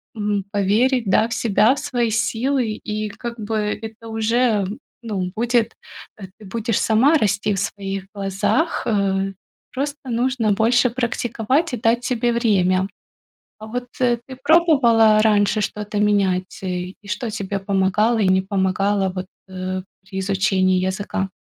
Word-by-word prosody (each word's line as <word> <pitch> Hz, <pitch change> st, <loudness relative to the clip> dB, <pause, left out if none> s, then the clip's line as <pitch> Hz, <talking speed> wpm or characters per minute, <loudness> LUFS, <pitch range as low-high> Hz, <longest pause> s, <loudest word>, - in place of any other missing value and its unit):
м, 205 Hz, -2 st, -1 dB
поверить, 225 Hz, +5 st, +2 dB
да, 215 Hz, +3 st, +3 dB
в 230 Hz, -, -4 dB
себя, 225 Hz, +1 st, +3 dB
в 280 Hz, -, -5 dB
свои 245 Hz, -5 st, -1 dB
силы. 230 Hz, 0 st, 0 dB
И 215 Hz, -1 st, -3 dB
как 235 Hz, +3 st, -7 dB
бы 220 Hz, +1 st, -3 dB, 0.3 s
это 225 Hz, 0 st, -9 dB
уже, 225 Hz, -2 st, +1 dB, 0.3 s
ну, 195 Hz, -6 st, -3 dB
будет 235 Hz, 0 st, +1 dB, 0.5 s
э, 195 Hz, -, -8 dB
ты 215 Hz, -, -14 dB
будешь 225 Hz, +2 st, -1 dB
сама 255 Hz, +9 st, +4 dB
расти 205 Hz, -3 st, 0 dB
в -, -, -2 dB
своих 195 Hz, -1 st, -4 dB
глазах, 200 Hz, -, 0 dB
э. 195 Hz, -2 st, 0 dB, 0.4 s
Просто 280 Hz, 0 st, -4 dB
нужно 240 Hz, -2 st, +1 dB
больше 235 Hz, +4 st, +3 dB
практиковать 245 Hz, +4 st, -1 dB
и -, -, -1 dB
дать 230 Hz, +2 st, +1 dB
себе 240 Hz, -1 st, 0 dB
время. 190 Hz, -5 st, +2 dB, 0.7 s
А 215 Hz, -, -8 dB
вот 245 Hz, +2 st, -4 dB
ты 240 Hz, -2 st, +2 dB, 0.2 s
пробовала 255 Hz, -9 st, +5 dB
раньше 210 Hz, 0 st, +3 dB
что-то 210 Hz, 0 st, -3 dB
менять? 195 Hz, -3 st, +1 dB
И 180 Hz, 0 st, -3 dB
что 210 Hz, +3 st, -3 dB
тебе 200 Hz, -2 st, -3 dB
помогало 200 Hz, +4 st, +1 dB
и 210 Hz, -, +2 dB
не 185 Hz, 0 st, +4 dB
помогало 195 Hz, 0 st, 0 dB
вот, 185 Hz, 0 st, -4 dB, 0.2 s
э, 185 Hz, 0 st, -4 dB, 0.2 s
при 190 Hz, 0 st, -7 dB
изучении 190 Hz, -1 st, +1 dB
языка? 190 Hz, 0 st, -2 dB
215 Hz, 145 wpm, -21 LUFS, 195-235 Hz, 0.7 s, пробовала